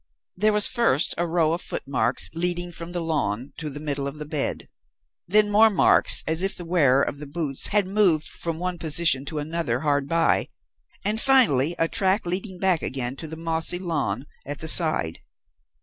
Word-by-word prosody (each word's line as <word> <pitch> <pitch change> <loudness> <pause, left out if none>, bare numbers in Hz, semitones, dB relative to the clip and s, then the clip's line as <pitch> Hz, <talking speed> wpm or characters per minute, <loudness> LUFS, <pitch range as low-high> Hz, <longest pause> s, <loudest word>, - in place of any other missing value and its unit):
"There 215 +4 +2
was 210 0 +2
first 230 - +1
a 175 - 0
row 165 -1 +1
of 170 - -3
footmarks 125 -4 -1
leading 175 +1 -1
from 170 0 -8
the 175 -1 -4
lawn 140 -7 -3
to 155 -2 -5
the 145 +1 -8
middle 145 -2 -3
of 140 - -6
the 150 - -7
bed; 150 -1 -3 0.6
then 210 +3 +3
more 220 +2 +5
marks 200 - +5
as 160 +2 -1
if 195 +1 -1
the 175 - -6
wearer 140 -6 +3
of 140 - -4
the 150 - -8
boots 145 -2 -2
had 205 -1 +1
moved 190 -6 +2
from 165 -2 -3
one 180 0 -4
position 155 -4 +3
to 155 +2 -5
another 150 -5 -3
hard 145 -2 0
by; 165 0 +1 0.6
and 215 +2 0
finally, 175 - +3
a 165 - +1
track 190 +3 0
leading 185 +2 -4
back 180 -3 +1
again 130 -1 -3
to 160 - -7
the 160 +1 -8
mossy 165 +1 -2
lawn 145 - -3 0.2
at 145 +1 -6
the 160 - -6
side. 155 - +3
165 Hz, 190 wpm, -23 LUFS, 145-180 Hz, 0.6 s, more